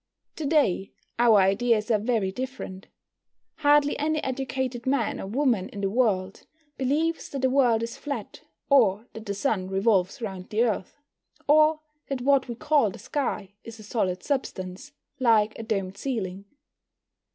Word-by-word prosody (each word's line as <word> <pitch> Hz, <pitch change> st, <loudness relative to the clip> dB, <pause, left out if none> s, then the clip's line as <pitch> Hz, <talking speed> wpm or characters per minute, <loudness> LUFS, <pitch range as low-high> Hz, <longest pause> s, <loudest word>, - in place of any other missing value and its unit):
To 310 Hz, -, -2 dB
day 275 Hz, -, +1 dB, 0.3 s
our 235 Hz, -3 st, +6 dB
ideas 215 Hz, +3 st, +2 dB
are 215 Hz, -, +3 dB
very 215 Hz, -3 st, 0 dB
different. 250 Hz, -5 st, -6 dB, 0.7 s
Hardly 290 Hz, -1 st, +3 dB
any 310 Hz, +1 st, 0 dB
educated 260 Hz, -2 st, -3 dB
man 260 Hz, -4 st, 0 dB
or -, -, -6 dB
woman 235 Hz, -4 st, +1 dB
in 200 Hz, -, -7 dB
the 195 Hz, -1 st, 0 dB
world 195 Hz, -5 st, 0 dB, 0.3 s
believes 310 Hz, +5 st, -1 dB
that 275 Hz, -2 st, -5 dB
the 260 Hz, -, +3 dB
world 245 Hz, -4 st, +3 dB
is 230 Hz, 0 st, -5 dB
flat, 285 Hz, -1 st, -6 dB, 0.3 s
or 225 Hz, -6 st, +4 dB
that 220 Hz, -1 st, -9 dB
the 200 Hz, -, -2 dB
Sun 200 Hz, -4 st, -1 dB
revolves 195 Hz, -1 st, +1 dB
round 190 Hz, -5 st, -6 dB
the 220 Hz, +2 st, +2 dB
Earth, 215 Hz, -6 st, -2 dB, 0.5 s
or 310 Hz, +1 st, +5 dB, 0.3 s
that 270 Hz, -2 st, -3 dB
what 275 Hz, +1 st, +3 dB
we 240 Hz, -, -5 dB
call 285 Hz, -2 st, +2 dB
the -, -, -9 dB
sky 210 Hz, -9 st, -3 dB
is 230 Hz, -1 st, -10 dB
a 215 Hz, -, -12 dB
solid 190 Hz, -5 st, -2 dB
substance, 200 Hz, -4 st, -4 dB, 0.3 s
like 220 Hz, -4 st, +3 dB
a -, -, -3 dB
domed 195 Hz, -4 st, -3 dB
ceiling. 200 Hz, -7 st, -4 dB
230 Hz, 155 wpm, -26 LUFS, 195-270 Hz, 0.7 s, our